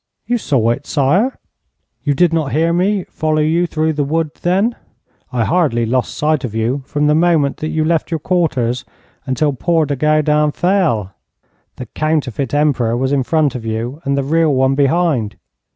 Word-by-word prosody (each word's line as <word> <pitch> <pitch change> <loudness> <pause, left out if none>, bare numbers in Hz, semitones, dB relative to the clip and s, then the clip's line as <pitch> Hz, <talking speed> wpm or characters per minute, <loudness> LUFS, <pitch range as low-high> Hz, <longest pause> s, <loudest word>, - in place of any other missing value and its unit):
'You 240 0 0
saw 120 - +1
it, 135 +4 -4
sire!' 165 - +1 0.7
'You 145 -1 0
did 175 +2 +3
not 155 -4 -1
hear 165 +3 +2
me 190 +2 +1
follow 155 -2 -1
you 170 +3 +1
through 160 0 0
the 145 -1 -1
wood, 155 +2 -1
then? 195 +7 +1 0.6
I 120 -2 0
hardly 140 -7 +1
lost 125 +2 -1
sight 155 -1 +1
of 115 -4 -5
you 120 +5 -1
from 150 0 -1
the 150 - +3
moment 160 -3 +2
that 155 - -4
you 155 -1 0
left 165 -1 0
your 165 -2 -2
quarters 130 -9 0 0.4
until 140 +3 0
poor 165 +4 +1
De 145 0 -2
Goudin 150 +1 +2
fell. 165 - 0 0.6
The 125 - -7
counterfeit 140 -2 -2
Emperor 140 -6 +1
was 130 +2 -1
in 140 -1 +2
front 150 +1 +1
of 125 - -6
you 115 +6 -4
and 140 0 0
the 140 - 0
real 160 +2 +2
one 130 +1 +2
behind. 140 -5 +1
150 Hz, 180 wpm, -17 LUFS, 130-165 Hz, 0.7 s, did